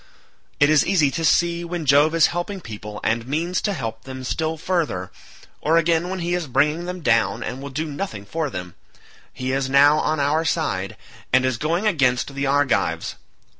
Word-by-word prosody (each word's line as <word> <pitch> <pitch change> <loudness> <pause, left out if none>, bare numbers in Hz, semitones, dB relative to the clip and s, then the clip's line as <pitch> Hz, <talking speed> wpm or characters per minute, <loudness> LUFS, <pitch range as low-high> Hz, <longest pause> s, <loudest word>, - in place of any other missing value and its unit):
It 145 +1 +5
is 155 -2 +5
easy 165 -7 +2
to 165 - -3
see 170 +1 +2
when 170 -2 -4
Jove 145 +4 +4
is 165 - +6
helping 175 +3 -3
people 105 - -8
and 115 +1 0
means 165 +6 -1
to 205 - 0
help 115 - -4
them 130 -1 -7
still 160 +5 -2
further, 150 - -2 0.5
or 160 +2 +3
again 165 +1 +2
when 190 -1 -4
he 175 +1 -1
is 175 -3 -1
bringing 150 +6 +1
them 180 0 -5
down 115 -5 +2
and 130 +2 -5
will 140 - -6
do 155 +4 -3
nothing 145 - -5
for 160 +7 -2
them; 90 -6 -7 0.6
he 130 0 -4
is 135 0 -1
now 145 +2 +5
on 155 0 0
our 145 +3 +1
side, 145 - -1 0.3
and 130 0 +4
is 130 -3 -1
going 170 +7 0
against 135 -8 +1
the 140 0 -2
Argives. 140 -2 +1
150 Hz, 190 wpm, -22 LUFS, 130-170 Hz, 0.6 s, is